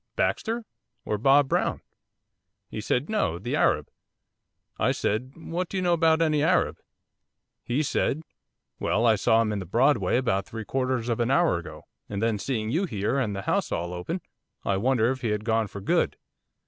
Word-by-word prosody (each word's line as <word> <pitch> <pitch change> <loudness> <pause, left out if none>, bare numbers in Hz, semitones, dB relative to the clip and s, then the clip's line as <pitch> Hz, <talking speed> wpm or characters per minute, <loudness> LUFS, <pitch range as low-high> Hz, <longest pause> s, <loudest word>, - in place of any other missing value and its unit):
Baxter? 230 0 -1 0.4
or 105 - -1
Bob 140 +4 +5
Brown?" - - 0 0.9
He 110 - -4
said, 125 +6 0
"No, 210 - 0
the 110 +8 -3
Arab." - - +2 0.9
I - - +2
said, 125 +6 -2
"What 170 +2 -4
do 195 - -3
you 185 - 0
know 175 -1 +3
about 165 -1 +4
any 155 -2 +2
Arab?" 160 - +2 0.8
He 130 +6 0
said, 155 +1 0 0.6
"Well, 115 - +1
I 115 - +6
saw 110 +2 +3
him 110 - -1
in 105 - -2
the 95 - -5
Broadway 120 - +3
about 120 -7 0
three 110 -1 -6
quarters 130 -2 -1
of 115 -1 -1
an 120 0 +1
hour 165 - +3
ago, 85 - -10 0.3
and 100 - -3
then, 110 -1 0
seeing 110 -2 -2
you 170 +8 +1
here, 110 - -1
and 105 -6 -1
the 95 - -4
house - - 0
all 85 +1 -2
open, 125 - -4 0.4
I 100 - +1
wondered 120 +2 +2
if 130 -1 -4
he 120 - -1
had 105 0 -2
gone 115 -1 +1
for 100 0 -8
good." - - +1
120 Hz, 185 wpm, -26 LUFS, 105-150 Hz, 0.9 s, I